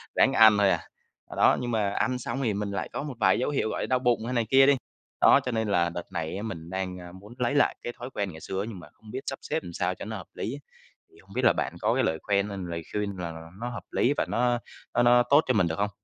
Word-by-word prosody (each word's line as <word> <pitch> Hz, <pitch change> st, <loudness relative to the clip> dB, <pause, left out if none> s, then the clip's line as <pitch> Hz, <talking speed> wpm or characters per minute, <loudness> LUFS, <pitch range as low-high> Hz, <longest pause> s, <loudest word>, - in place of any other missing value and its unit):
Ráng -, -, +4 dB
ăn 110 Hz, -2 st, +7 dB
thôi 100 Hz, -1 st, +4 dB
à. -, -, +2 dB, 0.6 s
Đó, -, -, +5 dB
nhưng 120 Hz, -1 st, -3 dB
mà 105 Hz, -3 st, +1 dB
ăn 125 Hz, +3 st, 0 dB
xong 125 Hz, +3 st, -3 dB
thì 110 Hz, -4 st, +1 dB
mình 100 Hz, 0 st, -3 dB
lại 100 Hz, -, -3 dB
có -, -, -3 dB
một 145 Hz, -3 st, -5 dB
vài 95 Hz, +1 st, +4 dB
dấu 130 Hz, -, 0 dB
hiệu 135 Hz, -6 st, 0 dB
gọi -, -, -3 dB
đau 130 Hz, -1 st, +2 dB
bụng 120 Hz, -3 st, +1 dB
hay 125 Hz, -, -3 dB
này 115 Hz, -2 st, +1 dB
kia 135 Hz, 0 st, +7 dB
đi. 140 Hz, -1 st, +5 dB, 0.4 s
Đó, -, -, +7 dB
cho 125 Hz, -, -1 dB
nên 110 Hz, -1 st, -1 dB
là 85 Hz, -4 st, +2 dB
đợt 85 Hz, +1 st, -7 dB
này 80 Hz, +2 st, -3 dB
á 105 Hz, -, -5 dB
mình 85 Hz, -7 st, -6 dB
đang, 95 Hz, 0 st, -3 dB
a, 90 Hz, 0 st, -10 dB
muốn 100 Hz, +5 st, -13 dB
lấy 125 Hz, +3 st, 0 dB
lại 145 Hz, -, +3 dB
cái 120 Hz, -, -4 dB
thói 125 Hz, +2 st, -6 dB
quen 100 Hz, -3 st, -2 dB
ngày 80 Hz, -, -11 dB
xưa 95 Hz, +2 st, -3 dB
nhưng 95 Hz, -5 st, -8 dB
mà 80 Hz, -, -12 dB
hông 110 Hz, -1 st, -14 dB
biết 130 Hz, -, -4 dB
sắp -, -, -3 dB
xếp 160 Hz, +1 st, -3 dB
làm 85 Hz, -, -8 dB
sao -, -, -1 dB
cho -, -, -8 dB
nó -, -, -5 dB
hợp -, -, -10 dB
lý, 130 Hz, +6 st, -4 dB, 0.5 s
thì -, -, -23 dB
hông -, -, -17 dB
biết -, -, +1 dB
là -, -, +6 dB
bạn -, -, -2 dB
có -, -, +2 dB
cái -, -, +2 dB
lời 80 Hz, 0 st, +1 dB
khoen 100 Hz, 0 st, +1 dB
hay 100 Hz, -, -5 dB
lời 85 Hz, -1 st, -4 dB
khuyên 100 Hz, -2 st, -2 dB
nào 80 Hz, -1 st, -7 dB
nó 120 Hz, -, -2 dB
hợp 115 Hz, -, -7 dB
lý, 140 Hz, -, +2 dB
và -, -, +1 dB
nó 120 Hz, 0 st, +1 dB, 0.3 s
nó 120 Hz, -, +3 dB
nó 120 Hz, 0 st, +6 dB
tốt 145 Hz, +2 st, +7 dB
cho 130 Hz, -, +3 dB
mình 95 Hz, -7 st, +3 dB
được 80 Hz, +3 st, -3 dB
hông? 105 Hz, -, +1 dB
105 Hz, 295 wpm, -27 LUFS, 95-120 Hz, 0.6 s, ăn